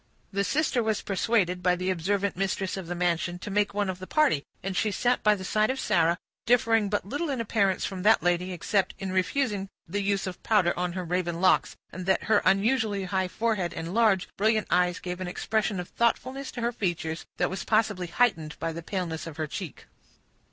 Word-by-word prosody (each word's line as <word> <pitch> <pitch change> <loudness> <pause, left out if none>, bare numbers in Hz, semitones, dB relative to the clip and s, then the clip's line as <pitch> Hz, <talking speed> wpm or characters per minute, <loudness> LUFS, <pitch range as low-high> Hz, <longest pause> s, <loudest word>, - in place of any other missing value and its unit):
The 200 0 +1
sister 280 +1 +1
was 220 -2 -1
persuaded, 195 -3 +1
by 180 0 +3
the 185 +1 -1
observant 195 +3 0
mistress 190 0 -1
of 190 -3 -6
the 175 - -3
mansion, 175 0 0
to 205 - -7
make 205 0 +2
one 205 -1 +1
of 185 -1 -4
the 185 - -8
party, 300 - +2 0.2
and 190 0 -3
she 215 - +1
sat 245 +5 +1
by 210 0 +4
the 190 - -7
side 215 +3 +1
of 265 +1 -1
Sarah, 170 -5 +2 0.3
differing 225 -3 +3
but 205 -1 -1
little 290 +10 -3
in 270 -3 -1
appearance 200 -4 +1
from 190 -2 -4
that 215 +4 +4
lady, 175 +1 +1
except 185 +2 0
in 190 -1 -4
refusing 195 +1 0 0.2
the 200 +5 -2
use 200 -1 0
of 185 -1 -6
powder 195 -6 +3
on 180 0 -2
her 185 0 -3
raven 175 -1 -1
locks, 185 0 +3 0.2
and 185 0 -7
that 190 - +2
her 220 - +3
unusually 210 0 +2
high 190 0 0
forehead 200 -4 -1
and 165 +2 -5
large, 210 -5 +3
brilliant 215 +1 +2
eyes 180 0 +3
gave 180 0 -5
an 185 - -3
expression 210 +2 -1
of 175 - -6
thoughtfulness 260 +3 -1
to 240 - -5
her 235 +1 +1
features, 170 -7 -3
that - - +1
was 190 - -4
possibly 215 -5 +1
heightened 170 -5 +1
by 165 0 -3
the 170 - -6
paleness 170 -2 -4
of 160 -2 -8
her 155 - -1
cheek. 175 +1 -7
190 Hz, 210 wpm, -27 LUFS, 180-215 Hz, 0.3 s, by